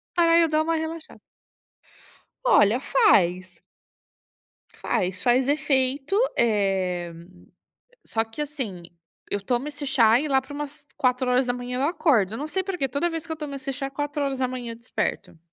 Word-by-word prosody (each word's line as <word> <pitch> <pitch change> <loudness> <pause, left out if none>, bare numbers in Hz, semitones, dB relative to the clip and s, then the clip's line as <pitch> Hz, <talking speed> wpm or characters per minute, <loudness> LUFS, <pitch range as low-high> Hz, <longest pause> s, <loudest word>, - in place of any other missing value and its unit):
Pra 335 -1 +5
eu 335 - +4
dá 310 0 +2
uma 330 +1 0
relaxada. 320 0 -5 1.3
Olha, 225 - +5
faz. 185 - +2 1.1
Faz, 185 0 -2
faz 250 +1 +3
efeito, 280 +1 0 0.2
eh, 190 -6 +1 0.9
só 225 0 0
que, 225 +6 -9
assim, 260 - -5 0.5
eu 205 - -1
tomo 245 +7 -1
esse 290 -1 -6
chá 235 -3 +5
e 305 - -3
lá 270 -1 +3
para 275 +2 -11
umas 290 0 -7
4:00 250 -1 0
eu 285 - +2
acordo. 235 - +2
Eu - - -5
não 295 - -4
sei 380 +4 -1
porque 360 -8 -2
toda 280 +7 -1
vez 325 -1 -5
que 320 - -5
eu 320 - -4
tomo 295 -2 -6
esse 275 0 -4
chá, 275 +1 -4
é - - -7
4:00 270 -4 -3
eu - - -9
desperto. 230 -7 -4
265 Hz, 155 wpm, -25 LUFS, 230-300 Hz, 1.3 s, Pra